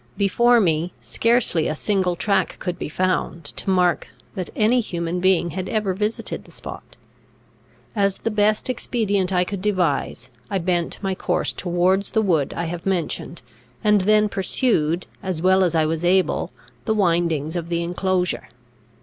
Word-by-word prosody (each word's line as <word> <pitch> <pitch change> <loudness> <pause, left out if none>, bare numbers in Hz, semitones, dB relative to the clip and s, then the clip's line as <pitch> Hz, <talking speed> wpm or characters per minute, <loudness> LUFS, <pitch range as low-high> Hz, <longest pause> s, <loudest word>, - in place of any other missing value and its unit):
Before 235 +5 +4
me, 170 -3 +1
scarcely 230 -8 +1
a 155 - -1
single 185 0 0
track 195 -1 0
could 180 -2 -4
be - - -4
found, 180 0 -1
to - - -5
mark 180 -2 +2 0.3
that 185 -4 -4
any 225 +4 +3
human 170 -5 -2
being 180 -2 +2
had 185 +3 -4
ever 210 -3 0
visited 210 +4 -3
the - - -19
spot. - - -10 1.0
As 200 -2 +1
the 225 - -2
best 210 0 +2
expedient 205 -6 0
I 180 -1 +3
could 195 +1 -5
devise, 185 -8 0 0.2
I 195 - 0
bent 175 -1 -1
my 195 -1 0
course 180 -1 -1
towards 180 +2 +1
the 220 - +1
wood 160 -8 +1
I 170 - -1
have 170 +2 -5
mentioned, 170 -4 -2 0.4
and 210 -1 +4
then 210 +2 +4
pursued, 185 -5 0 0.2
as 185 -4 -3
well 190 +2 +4
as 175 -2 +1
I 160 -1 +3
was 160 +1 -2
able, 185 +1 +2 0.3
the 220 - +1
windings 170 -5 +1
of 170 -1 -3
the 170 0 0
inclosure. 180 +1 -1
185 Hz, 160 wpm, -22 LUFS, 170-205 Hz, 1.0 s, Before